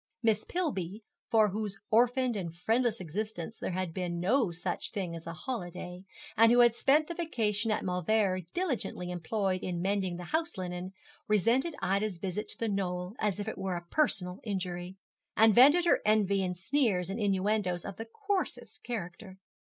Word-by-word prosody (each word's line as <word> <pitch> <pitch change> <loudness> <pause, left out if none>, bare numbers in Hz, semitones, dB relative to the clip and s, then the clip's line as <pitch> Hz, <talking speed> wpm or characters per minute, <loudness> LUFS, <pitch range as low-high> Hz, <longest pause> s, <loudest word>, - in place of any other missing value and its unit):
Miss 220 -2 +2
Pillby, 215 - -2 0.3
for 220 -2 +5
whose 205 0 -3
orphaned 245 +2 +3
and 170 -5 -4
friendless 225 +5 +1
existence 190 +3 -4
there - - -3
had 185 -2 -2
been 175 -1 -3
no 220 +5 +2
such 175 +1 -3
thing 185 -6 -3
as 165 0 -9
a 165 - -4
holiday, 180 -3 -6 0.3
and 225 +1 +6
who 245 0 +6
had 240 -1 +6
spent 285 +6 +3
the 340 - -5
vacation 225 - -1
at 215 - 0
Mauleverer 185 +1 +1
diligently 260 - -2
employed 185 +2 -1
in 175 -2 -3
mending 190 -1 0
the 180 - -6
house 320 - -1
linen, 180 0 -5 0.3
resented 235 - +2
Ida's 200 0 0
visit 195 +4 -3
to - - -9
The 230 - -1
Knoll 180 -2 -2
as 210 -2 0
if 205 - -4
it 220 - -4
were 190 -2 -2
a 175 - -8
personal 190 -12 +1
injury, 185 -3 -4 0.4
and 220 0 +7
vented 290 - +7
her 340 - +4
envy 205 -2 +3
in 180 -1 -1
sneers 190 -3 +1
and 205 - -4
innuendoes 195 -3 0
of 195 -2 -6
the 225 - -5
coarsest 400 - -2
character. 190 -3 -6
200 Hz, 175 wpm, -30 LUFS, 180-230 Hz, 0.4 s, and